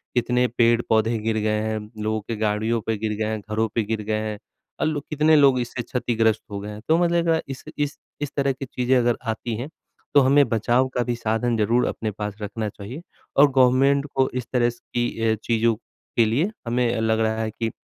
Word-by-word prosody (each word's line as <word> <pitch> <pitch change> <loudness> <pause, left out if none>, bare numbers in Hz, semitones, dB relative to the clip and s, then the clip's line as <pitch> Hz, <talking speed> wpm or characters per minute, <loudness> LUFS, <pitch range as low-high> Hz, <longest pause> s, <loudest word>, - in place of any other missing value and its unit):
कितने 125 +1 +2
पेड़-पौधे 115 -1 +3
गिर 110 0 -1
गए 105 0 0
हैं 110 0 -2 0.2
लोगों 110 0 -1
के 115 +3 -5
गाड़ियों 110 +2 0
पे 110 - 0
गिर 110 +1 -2
गए 110 - -1
हैं, 110 -1 -2
घरों 110 +1 +1
पे 115 - +2
गिर 110 +1 -2
गए 110 +1 -1
हैं। 105 -1 -4 0.4
अ, - - 0
लो 155 -2 0
कितने 155 +1 +4
लोग 140 -4 +5
इससे 120 0 -3
क्षतिग्रस्त 115 -4 0
हो 100 - -4
गए 105 - -6
हैं 105 0 -8
तो 160 - +4
मतलब 170 -1 +2
अ, 160 -1 +3
इस 135 -1 -7
इस 145 0 -2 0.2
इस 145 - -3
तरह 140 -1 +2
की 135 +1 -6
चीज़ें 125 +1 0
अगर 120 -1 +2
आती 110 0 -4
हैं 125 +6 -5 0.4
तो 145 - +7
हमें 140 +2 +5
बचाव 120 +3 +2
का 125 - +2
भी 120 -1 -2
साधन 115 +1 0
ज़रूर 115 +3 +2
अपने 110 -1 -3
पास 105 0 -5
रखना 105 +1 -3
चाहिए 105 +10 -9 0.4
और 140 0 +7
गवर्नमेंट 135 +2 +4
को 130 0 +3
इस 125 -2 -3
तरह 120 -1 +3
स 120 0 -10
की 120 0 +1 0.2
अ, - - +2
चीज़ों 115 +1 +1
के 115 +1 -2
लिए 140 - +1 0.2
हमें 120 -1 +1
लग 110 0 +1
रहा 110 0 0
है 110 - -1
कि 115 +1 -3
अ - - -12
115 Hz, 220 wpm, -23 LUFS, 110-130 Hz, 0.4 s, तो